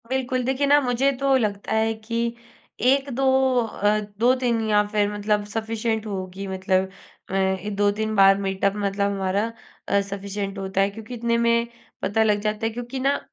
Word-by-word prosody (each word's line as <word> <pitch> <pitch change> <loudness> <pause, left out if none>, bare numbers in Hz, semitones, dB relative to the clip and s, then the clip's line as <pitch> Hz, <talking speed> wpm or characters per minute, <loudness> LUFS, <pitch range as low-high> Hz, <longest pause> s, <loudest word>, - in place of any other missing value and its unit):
बिल्कुल। 255 -1 -1
देखिए 265 +3 0
ना 290 +1 +6
मुझे 255 +1 +1
तो 275 -1 +3
लगता 205 -4 -2
है 220 0 +2
कि 230 +2 -3 0.5
1-2 270 -1 +1 0.4
अ, 210 -2 0 0.2
2-3 245 -1 +2
या 210 0 +4
फिर 205 -1 0
मतलब 210 0 0
सफीशिएंट 220 +1 -2
होगी 190 -1 -5
मतलब 190 0 0 0.4
मैं 190 +1 -1
2-3 205 +2 0
बार 195 -1 +6
मीटअप 195 0 0
मतलब 200 0 0
हमारा 195 +1 0 0.4
अ, 200 - +3
सफीशिएंट 200 0 -4
होता 195 0 -1
है 195 - +3
क्योंकि 220 +3 -9
इतने 235 0 0
में 235 0 +2 0.3
पता 220 +2 +2
लग 210 -1 +2
जाता 215 +1 -2
है 225 - 0
क्योंकि 245 +3 -5
ना 275 +2 +1
215 Hz, 160 wpm, -23 LUFS, 200-235 Hz, 0.5 s, ना